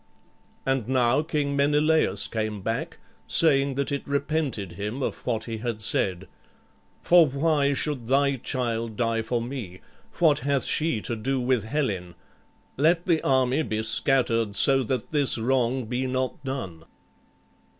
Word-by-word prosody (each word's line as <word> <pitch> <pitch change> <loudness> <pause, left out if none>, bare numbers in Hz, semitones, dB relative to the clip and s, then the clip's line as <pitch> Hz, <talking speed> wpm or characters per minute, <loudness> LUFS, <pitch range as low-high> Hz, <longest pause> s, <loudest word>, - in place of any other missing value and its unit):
And 135 -4 -1
now 130 +1 +2
King 150 -3 -2
Menelaüs 145 -6 +2
came 110 -2 -4
back, 115 +2 -3 0.3
saying 140 -4 +3
that 140 +1 -2
it 140 - -4
repented 140 - -2
him 105 +9 -5
of - - -4
what 115 -3 -1
he 115 -1 -5
had 115 -1 -4
said, 95 -3 +1 0.8
"For 175 -2 +6
why 140 0 +1
should 135 -5 -3
thy 140 +1 +2
child 115 -3 -3
die 115 0 0
for 120 +2 -2
me? 115 -8 -7 0.4
What 155 -4 +3
hath 140 +1 0
she 150 -9 0
to 120 - -4
do 130 +4 -2
with 125 -3 0
Helen? 100 - -3 0.6
Let 165 +5 +2
the 165 -4 +1
army 130 +2 +1
be 110 -7 -3
scattered, 115 -3 +1
so 135 +4 +4
that 125 0 -3
this 145 -5 +5
wrong 125 +1 0
be 125 +3 -2
not 130 +1 -3
done." 95 - -6
130 Hz, 145 wpm, -25 LUFS, 115-140 Hz, 0.8 s, For